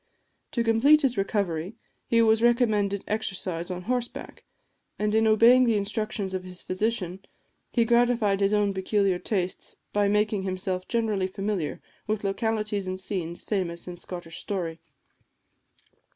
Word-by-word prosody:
To 235 - +1
complete 265 +7 +5
his 255 -2 +2
recovery, 195 -2 -1 0.3
he 230 0 +4
was 220 0 +4
recommended 215 -5 +2
exercise 190 -5 -3
on 180 0 -5
horseback; 245 +2 -4 0.5
and 210 0 0
in 220 0 +4
obeying 235 +4 +6
the 230 -3 +3
instructions 205 -1 -2
of 185 -1 -3
his 180 0 -10
physician, 190 -2 -2 0.5
he 235 - +2
gratified 235 -4 +3
his 195 0 +3
own 205 -1 +2
peculiar 190 -1 +1
tastes 185 -3 -3 0.2
by 205 -1 +3
making 210 0 +1
himself 185 -1 -3
generally 215 -5 0
familiar 195 -4 -3 0.2
with 215 0 -1
localities 210 0 -1
and 185 0 -3
scenes 180 -3 -4
famous 180 -5 -2
in 180 - -6
Scottish 175 -1 -8
story. 170 -5 -4
205 Hz, 135 wpm, -26 LUFS, 185-225 Hz, 0.5 s, obeying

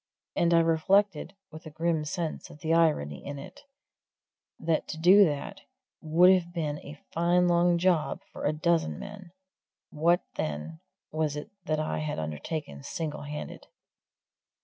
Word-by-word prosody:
And 170 0 +2
I 165 0 +6
reflected, 180 +2 +2 0.2
with 160 +1 -10
a - - -6
grim 160 0 -1
sense 165 0 -4
of 150 - -14
the 160 +1 +1
irony 145 - +1
of 145 - -5
it, 140 - -10 1.0
that 160 -1 0
to 160 - -5
do 185 +5 +7
that 145 -4 -4 0.4
would 170 +4 +5
have 175 -2 0
been 150 -4 -3
a 145 +1 -10
fine 175 +2 +3
long 175 0 +3
job 170 -3 +1
for - - -5
a 145 - +3
dozen 155 - 0
men 200 -3 -9 0.6
what, 170 +4 +2
then, 75 +2 -4 0.3
was 155 -1 -1
it 150 +9 -7
that 155 -3 0
I 155 - -2
had 155 -1 -3
undertaken 80 - -5
single 150 - -4
handed? 150 +1 -7
160 Hz, 150 wpm, -28 LUFS, 150-170 Hz, 1.0 s, do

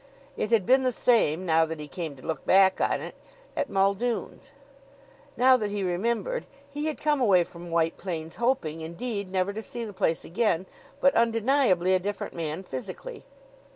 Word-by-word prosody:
It 215 - -2
had 225 -5 +3
been 260 +4 +5
the 255 -1 +1
same, 185 -9 +2
now 165 -1 +4
that 160 -1 -4
he 150 - -7
came 155 0 -5
to 130 - -15
look 160 -4 -3
back 190 0 +4
on - - +1
it, - - -7 0.4
at - - -1
Muldoon's. 200 +7 -1 0.9
Now 255 +1 +6
that 210 -4 -2
he 205 -1 -2
remembered, 235 - -1 0.2
he 295 +2 -4
had 310 - -3
come 300 -3 +1
away 190 -7 +5
from 170 0 -11
White 165 -1 +1
Plains 165 -4 -5
hoping, 230 - 0
indeed, 200 +5 -4
never 190 +1 0
to 220 - -5
see 235 +1 -6
the 210 - -8
place 185 -4 0
again, 190 -2 0 0.4
but 275 - +5
undeniably 230 -5 +3
a 185 - +4
different 200 +2 -4
man 165 +1 -4
physically. 190 - -7
195 Hz, 180 wpm, -27 LUFS, 170-240 Hz, 0.9 s, Now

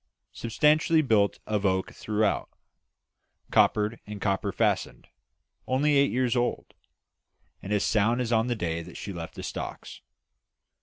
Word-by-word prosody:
Substantially 155 +6 +2
built 105 -6 +2
of 105 -2 -1
oak 95 -1 0
throughout; 105 -1 -1 1.0
coppered, 105 +2 +3
and 105 -1 -7
copper 100 -1 -1
fastened. - - -1 0.6
Only 145 +3 +2
8 140 0 +4
years 125 -1 0
old, 120 0 -1 0.9
and 100 - -7
as 105 -1 +2
sound 110 +2 +2
as 125 -2 -2
on 115 0 +2
the 120 - 0
day 85 -5 -2
that 85 +1 -10
she 100 - -6
left 85 -2 -7
the - - -7
stocks. - - -6
110 Hz, 140 wpm, -27 LUFS, 100-125 Hz, 1.0 s, 8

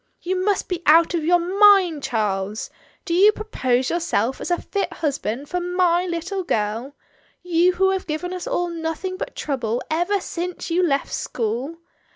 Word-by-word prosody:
"You 370 +1 -1
must 410 0 0
be 360 -2 -3
out 330 +3 +6
of 335 -2 -1
your 350 +3 +4
mind, 370 -3 +4
Charles. 210 -3 -2 0.3
Do 340 - -2
you 395 +5 +6
propose 260 - -1
yourself 270 -8 -1
as - - -4
a 350 - +1
fit 400 - -3
husband 280 -4 -3
for 360 - -2
my 355 0 +1
little 360 +3 -3
girl 225 0 -2 0.2
— - - -37
you 355 +1 +3
who 380 +1 +2
have 380 -1 -3
given 345 +4 -3
us 365 - -5
all 350 0 -1
nothing 335 +3 -4
but 370 - -6
trouble 245 -5 -2
ever 350 +6 +1
since 360 -1 -5
you 350 +2 +2
left 280 -6 0
school? 245 +8 -3
340 Hz, 175 wpm, -22 LUFS, 275-365 Hz, 0.3 s, out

